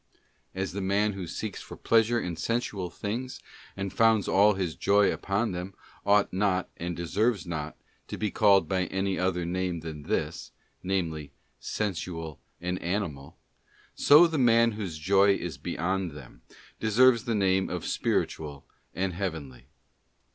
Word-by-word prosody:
As 95 0 -2
the 100 +2 -4
man 100 +2 +1
who 95 -3 -6
seeks 105 +4 -5
for - - -10
pleasure 115 +1 +3
in 90 -6 -4
sensual 100 -1 -2
things, 115 +9 -5 0.4
and 100 -1 -4
founds 110 -2 +3
all 105 +2 +5
his 90 -4 -2
joy 100 0 +3
upon 100 +3 -1
them, 90 +2 -6 0.3
ought 100 -1 +4
not, 95 -1 +1
and 85 0 -4
deserves 100 +3 0
not, 80 -3 -5 0.3
to - - -6
be 105 -1 -1
called 100 -3 +4
by 95 -1 0
any 95 0 -2
other 90 -2 0
name 90 -1 -2
than 80 -2 -7
this, - - -3 0.3
namely, 80 -6 -2 0.3
sensual 85 -6 -4 0.2
and 90 +1 -3
animal; 85 -7 -3 0.6
so 150 +4 +7
the 165 -3 -1
man 115 -2 +5
whose 100 -7 -5
joy 100 +4 +4
is 85 -8 -5
beyond 90 -1 -2
them, 65 -4 -13 0.4
deserves 115 +2 +4
the 115 - 0
name 95 -2 +2
of - - -4
spiritual 75 -3 -2 0.3
and 95 0 -1
heavenly. 80 -9 -5
95 Hz, 145 wpm, -28 LUFS, 85-105 Hz, 0.6 s, so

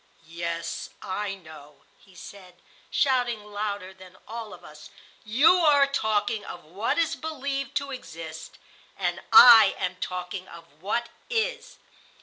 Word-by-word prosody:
"Yes, 170 0 -5
I 195 +1 -3
know," 155 -5 -15 0.2
he 190 -2 -22
said, 185 -1 -12 0.3
shouting 245 -6 0
louder 205 -2 -5
than 185 -1 -16
all 225 -1 -7
of - - -13
us; 150 0 -13 0.3
"you 275 +12 +4
are 295 -5 +5
talking 220 -5 -1
of 175 - -9
what 190 +8 -2
is 335 -1 +1
believed 280 -3 -4
to 280 -1 -2
exist, 165 -11 -9 0.4
and - - -2
I 225 -5 +9
am 185 -1 -3
talking 180 +1 -5
of 170 -1 -12 0.2
what 235 +5 -2 0.2
is. 485 +1 -2
210 Hz, 130 wpm, -26 LUFS, 180-270 Hz, 0.4 s, I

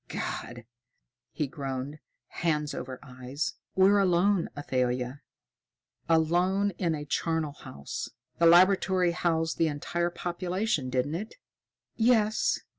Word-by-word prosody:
"God!" 120 -1 -5 0.7
he 150 - -1
groaned, 135 +1 -5 0.3
hands 150 -3 -1
over 130 0 -6
eyes. 130 +3 -4 0.2
"We're 195 +2 +5
alone, 185 0 +2
Athalia! 125 -1 -1 0.9
Alone 175 +5 +2
in 170 -3 +1
a 150 -1 -6
charnal 160 +1 -1
house. 70 - -7 0.3
The 170 - +6
laboratory 185 +1 +5
housed 165 -2 0
the 165 - +4
entire 170 +4 -1
population, 175 -3 -2
didn't 130 +3 0
it?" 200 +7 -5 0.6
"Yes. 220 -2 +2
165 Hz, 110 wpm, -28 LUFS, 140-185 Hz, 0.9 s, The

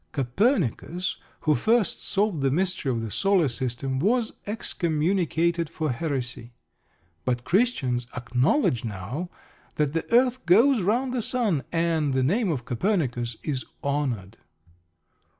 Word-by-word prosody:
Copernicus, 175 - 0 0.2
who 155 - +3
first 225 +6 +1
solved 200 -6 0
the 135 - +2
mystery 180 -1 0
of 115 -2 -1
the 110 -2 -5
Solar 190 - +3
System, 130 +1 -2
was 225 - +1
excommunicated 170 -4 0
for 155 -2 -2
heresy. 125 -4 -4 0.7
But 125 -1 -1
Christians 135 - +1
acknowledge 125 - +1
now 115 - -5 0.5
that 150 -1 0
the 165 +5 -3
earth 250 +1 +3
goes 230 +7 +5
round 240 +7 +1
the 250 - 0
sun, 215 - +1
and 165 -4 +1
the 130 - +2
name 200 - +1
of 130 -8 -2
Copernicus 125 - -1
is 135 -4 -2 0.2
honoured. 125 -8 -2
155 Hz, 125 wpm, -26 LUFS, 125-200 Hz, 0.7 s, goes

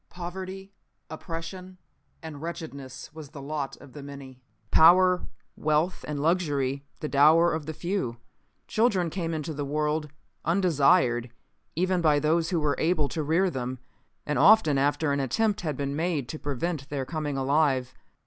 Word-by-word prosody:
Poverty, 190 +2 -7 0.4
oppression 170 +4 -7 0.5
and 155 -3 -8
wretchedness 155 -6 -7
was 155 -3 -10
the 150 -1 -10
lot 140 -1 -4
of 140 -3 -15
the 145 - -8
many. 140 -2 -10 0.3
Power, 180 +3 +6 0.3
wealth 155 +4 0
and 150 -1 -3
luxury 145 -5 0 0.2
the 150 - -2
dower 155 +4 +5
of 160 -2 -4
the 160 - -3
few. 170 -11 -2 0.5
"Children 195 -7 +1
came 170 -2 -3
into 155 0 -3
the 145 0 -3
world 150 +1 -1 0.3
undesired 155 -8 +3 0.5
even 185 +2 +1
by 155 -3 +4
those 160 +3 +1
who 175 - +1
were 150 -2 +1
able 155 -4 +1
to 160 - -3
rear 170 +5 +2
them, 130 -1 -4 0.5
and 150 - -1
often 200 -10 +6
after 145 +2 +1
an 140 - 0
attempt 205 - 0
had 155 -6 -3
been 140 0 -2
made 160 -5 -1
to 155 - -6
prevent 145 +1 -3
their 140 -2 -3
coming 150 -2 -3
alive. 135 -2 +1
155 Hz, 155 wpm, -27 LUFS, 140-175 Hz, 0.5 s, Power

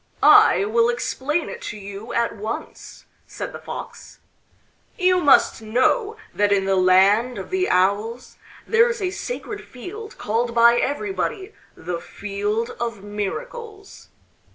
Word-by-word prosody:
"I 195 - +7
will 230 +2 +2
explain 275 +6 -2
it - - -8
to 215 - -7
you 200 +3 -8
at 235 0 0
once," 220 +2 -7 0.2
said - - -7
the - - -7
Fox. - - -9 0.8
"You 365 -1 +3
must 285 -6 +4
know 260 - +1 0.2
that 205 0 +1
in 195 -1 +2
the 195 0 +2
Land 195 +6 +4
of - - -7
the 375 0 0
Owls 205 +6 0 0.3
there 460 +1 +4
is 475 -1 -3
a 370 -3 -1
sacred 420 -1 -6
field 415 - -10
called 235 +2 -1
by 235 0 +6
everybody 385 - -3 0.2
the 175 -1 -5
Field 205 +3 -3
of 230 -4 -4
Miracles. 405 - -7
235 Hz, 135 wpm, -22 LUFS, -, 0.8 s, I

